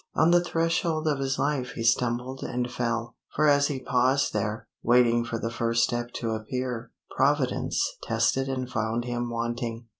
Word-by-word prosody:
On 170 Hz, -, +4 dB
the 175 Hz, 0 st, +5 dB
threshold 165 Hz, -1 st, 0 dB
of 145 Hz, -3 st, +1 dB
his 135 Hz, 0 st, -1 dB
life 140 Hz, -3 st, -1 dB
he 115 Hz, -, -4 dB
stumbled 125 Hz, +2 st, +1 dB
and 125 Hz, 0 st, -2 dB
fell; 115 Hz, -1 st, -2 dB, 0.2 s
for 155 Hz, -, +3 dB
as 145 Hz, -1 st, +5 dB
he 140 Hz, -3 st, -3 dB
paused 130 Hz, +2 st, +2 dB
there, 105 Hz, 0 st, -2 dB
waiting 120 Hz, 0 st, +4 dB
for 115 Hz, 0 st, -3 dB
the 115 Hz, 0 st, -3 dB
first 115 Hz, 0 st, +1 dB
step 120 Hz, 0 st, -1 dB
to 115 Hz, -2 st, -2 dB
appear, 120 Hz, +2 st, -3 dB, 0.3 s
Providence 135 Hz, -1 st, +1 dB, 0.2 s
tested 135 Hz, 0 st, +1 dB
and 130 Hz, -1 st, -2 dB
found 115 Hz, 0 st, -2 dB
him 120 Hz, 0 st, -2 dB
wanting. 115 Hz, 0 st, -3 dB
125 Hz, 170 wpm, -27 LUFS, 115-135 Hz, 0.3 s, the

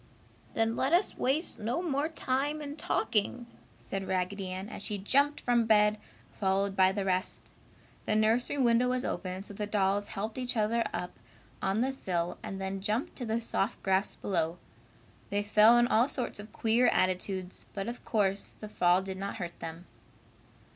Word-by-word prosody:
"Then 225 Hz, 0 st, +1 dB
let 270 Hz, +5 st, +1 dB
us 355 Hz, +4 st, +3 dB
waste 290 Hz, +7 st, -1 dB
no 240 Hz, +11 st, -1 dB
more 300 Hz, -2 st, 0 dB
time 290 Hz, 0 st, -1 dB
in 290 Hz, -1 st, -6 dB
talking!" 245 Hz, -, 0 dB, 0.3 s
said 195 Hz, -1 st, -5 dB
Raggedy 190 Hz, +1 st, -1 dB
Ann, 185 Hz, +2 st, -5 dB
as -, -, -7 dB
she 210 Hz, -, -2 dB
jumped 280 Hz, +9 st, +2 dB
from 240 Hz, -2 st, +2 dB
bed, 210 Hz, -1 st, +4 dB, 0.3 s
followed 195 Hz, 0 st, 0 dB
by 190 Hz, -1 st, +5 dB
the 195 Hz, 0 st, -2 dB
rest. 185 Hz, 0 st, 0 dB, 0.6 s
The 215 Hz, -, +2 dB
nursery 225 Hz, +6 st, +2 dB
window 245 Hz, -1 st, +3 dB
was 255 Hz, 0 st, 0 dB
open, 185 Hz, +2 st, -3 dB
so 205 Hz, -, -7 dB
the 210 Hz, +1 st, -3 dB
dolls 205 Hz, 0 st, +1 dB
helped 215 Hz, +5 st, -4 dB
each 250 Hz, -1 st, 0 dB
other 225 Hz, +2 st, +2 dB
up 180 Hz, -, -5 dB, 0.4 s
on 195 Hz, +3 st, +1 dB
the 265 Hz, +2 st, +1 dB
sill 175 Hz, -9 st, -2 dB
and 195 Hz, -, -6 dB
then 190 Hz, 0 st, -3 dB
jumped 215 Hz, +6 st, -1 dB
to 245 Hz, -, -4 dB
the 225 Hz, +1 st, -1 dB
soft 220 Hz, 0 st, -1 dB
grass 190 Hz, +1 st, +1 dB
below. 170 Hz, -3 st, -1 dB, 0.7 s
They 205 Hz, 0 st, 0 dB
fell 215 Hz, +3 st, +6 dB
in 240 Hz, -, +5 dB
all 235 Hz, +2 st, +4 dB
sorts 245 Hz, -5 st, -2 dB
of 210 Hz, +1 st, -9 dB
queer 230 Hz, +2 st, +3 dB
attitudes, 185 Hz, 0 st, 0 dB
but 195 Hz, +1 st, -3 dB
of 240 Hz, +1 st, -6 dB
course 200 Hz, -3 st, 0 dB
the 215 Hz, -, -7 dB
fall 180 Hz, -1 st, +3 dB
did 190 Hz, -1 st, -5 dB
not 200 Hz, +1 st, -3 dB
hurt 175 Hz, -5 st, -6 dB
them. 165 Hz, +2 st, -7 dB
210 Hz, 175 wpm, -30 LUFS, 190-240 Hz, 0.7 s, fell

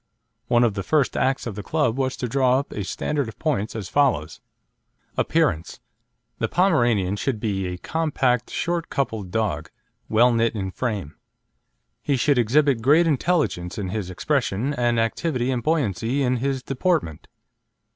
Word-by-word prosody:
One 120 Hz, 0 st, +4 dB
of 115 Hz, -3 st, +2 dB
the 100 Hz, -, -3 dB
first 145 Hz, +6 st, +1 dB
acts 135 Hz, +1 st, 0 dB
of 115 Hz, -, -4 dB
the 105 Hz, -, -6 dB
club 145 Hz, -2 st, 0 dB
was 130 Hz, -1 st, -1 dB
to 125 Hz, -, -2 dB
draw 130 Hz, 0 st, +3 dB
up 140 Hz, -, -3 dB
a 105 Hz, -, -4 dB
standard 140 Hz, +6 st, -2 dB
of -, -, -12 dB
points 125 Hz, -11 st, -1 dB
as 105 Hz, -5 st, -4 dB
follows: 105 Hz, -, +1 dB, 0.7 s
APPEARANCE 145 Hz, -, 0 dB, 0.6 s
The -, -, +1 dB
Pomeranian 120 Hz, -, +2 dB
should 120 Hz, 0 st, -2 dB
be 95 Hz, -4 st, -1 dB
a 90 Hz, 0 st, -4 dB
compact, 130 Hz, -, 0 dB
short 170 Hz, -1 st, -2 dB
coupled 110 Hz, -8 st, -2 dB
dog, 110 Hz, +3 st, -1 dB, 0.4 s
well 120 Hz, +3 st, +4 dB
knit 115 Hz, 0 st, +1 dB
in 95 Hz, -2 st, -3 dB
frame. 100 Hz, -, -4 dB, 0.8 s
He 140 Hz, -2 st, 0 dB
should 140 Hz, +1 st, +2 dB
exhibit 130 Hz, +1 st, +3 dB
great 150 Hz, +8 st, +5 dB
intelligence 145 Hz, -, 0 dB
in 100 Hz, -3 st, -3 dB
his 100 Hz, -2 st, -3 dB
expression, 130 Hz, -, -1 dB
and 120 Hz, -3 st, +1 dB
activity 125 Hz, +2 st, 0 dB
and 125 Hz, -2 st, -1 dB
buoyancy 130 Hz, -, 0 dB
in 125 Hz, 0 st, +1 dB
his 135 Hz, +1 st, -2 dB
deportment. 135 Hz, -, -1 dB
125 Hz, 155 wpm, -23 LUFS, 105-140 Hz, 0.8 s, great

